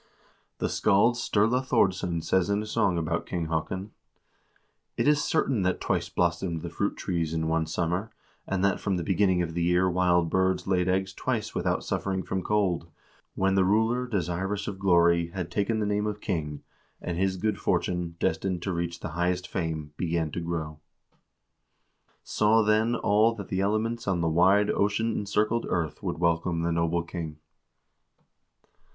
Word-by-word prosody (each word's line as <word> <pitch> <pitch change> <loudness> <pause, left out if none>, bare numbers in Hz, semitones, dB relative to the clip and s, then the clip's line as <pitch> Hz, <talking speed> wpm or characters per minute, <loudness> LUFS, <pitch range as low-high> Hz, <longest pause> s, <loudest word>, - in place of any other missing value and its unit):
1 - - -35 0.5
The - - -1
scald 100 +5 +3
Sturla 120 +1 +1
Thordsson 90 -8 +1
says 95 +3 +1
in 100 +1 +1
a - - -6
song 105 -5 +1
about 85 0 -2
King 85 -3 -3
Haakon: 95 +5 -3 0.5
" - - -43
It - - +1
is 150 0 +4
certain 140 - +1
that 90 0 0
twice - - -1
blossomed 85 -1 -1
the 85 - -5
fruit 100 +4 -2
trees 85 -3 -2
in 80 0 -1
one 80 0 0
summer, 85 +6 -1 0.4
and 95 0 0
that 100 - +1
from 95 -3 -1
the 85 - -2
beginning 95 0 +2
of 80 -1 -4
the 85 - -2
year 90 +2 +3
wild 90 -1 +2
birds 95 0 +1
laid 95 -1 +1
eggs 95 +1 0
twice - - -2
without - - -1
suffering 95 -1 -2
from 95 - -2
cold, 95 -5 0 0.5
when 95 0 +2
the 95 -1 +4
ruler, 110 +6 +2
desirous 95 0 -2
of 100 -2 -5
glory, 85 -3 +4
had 85 0 -5
taken 105 +4 0
the 105 - 0
name 105 +1 0
of 105 0 -3
king, 75 -8 -3 0.4
and 85 - -4
his 95 0 +1
good 105 +1 -1
fortune, 90 -2 -1
destined 90 +2 -1
to 95 - -2
reach 85 0 -3
the - - -4
highest 90 +2 -1
fame, 80 -4 -4
began 85 -3 -1
to 85 - -4
grow. 80 -2 -4 0.7
" - - -53 0.7
Saw, 110 +1 +3
then, 110 +3 +2
all 110 +1 +3
that 100 -4 -8
the 95 0 0
elements 110 +3 -1
on 90 -3 +1
the 85 - +1
wide 95 +5 +4
ocean 105 +3 +1
encircled 105 +3 0
earth 85 -3 -2
would - - -3
welcome 85 0 0
the 85 - 0
noble 85 +1 0
king." 85 -3 -6
95 Hz, 175 wpm, -27 LUFS, 85-105 Hz, 0.7 s, is